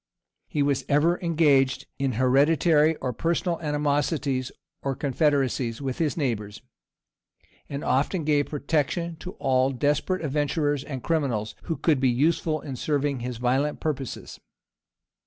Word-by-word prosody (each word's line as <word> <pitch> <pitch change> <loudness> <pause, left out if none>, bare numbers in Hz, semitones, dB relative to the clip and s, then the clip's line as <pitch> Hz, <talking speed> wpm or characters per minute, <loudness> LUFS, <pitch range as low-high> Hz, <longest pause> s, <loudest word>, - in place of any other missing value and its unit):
[] - - -60
He 145 - 0
was 140 -2 +1
ever 160 +5 +3
engaged 140 -6 +3
in 135 -2 0
hereditary 150 +5 +3
or 125 -4 -3
personal 170 +4 -1
animosities 145 -3 0 0.3
or 135 -1 -2
confederacies 135 -4 0
with 135 -2 -4
his 160 -2 0
neighbors, 105 -8 -3 1.1
and 140 +1 -4
often 150 +6 +1
gave 145 -1 +2
protection 160 +3 -1
to 180 +4 -8
all 130 -1 +2
desperate 150 +6 0
adventurers 145 0 0
and 135 -4 -6
criminals, 125 -10 -1
who 165 - -2
could 155 -5 +2
be 130 -1 +3
useful 155 +4 +1
in 135 -4 -6
serving 145 -1 0
his 125 0 -4
violent 130 +5 0
purposes. 140 -6 -4
145 Hz, 135 wpm, -25 LUFS, 130-155 Hz, 1.1 s, ever